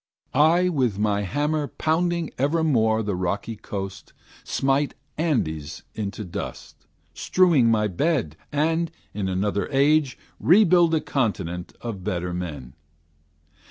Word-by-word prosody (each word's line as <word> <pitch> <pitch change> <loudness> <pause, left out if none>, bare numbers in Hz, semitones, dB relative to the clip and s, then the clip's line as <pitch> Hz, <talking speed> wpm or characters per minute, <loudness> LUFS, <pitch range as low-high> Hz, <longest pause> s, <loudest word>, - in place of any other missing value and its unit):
I 165 +6 +4
with 130 - 0
my 105 -1 +1
hammer 145 - -1
pounding 170 +1 0
evermore 130 -7 +2
The 105 -1 -2
rocky 100 +5 -2
coast, 100 -1 -7 0.3
smite 135 +1 0 0.2
Andes 80 - -1
into 105 0 -4
dust, 85 -5 -8 0.3
Strewing 165 - +3
my 105 -2 +2
bed, 110 - 0 0.2
and, 160 +3 +1 0.2
in 100 -2 -2
another 100 +2 -1
age, 140 0 +3 0.2
Rebuild 175 -2 +5
a 155 - +1
continent 95 - -2
of 110 -6 -5
better 90 -2 -2
men. 75 -8 -6
115 Hz, 115 wpm, -24 LUFS, 95-155 Hz, 0.3 s, Rebuild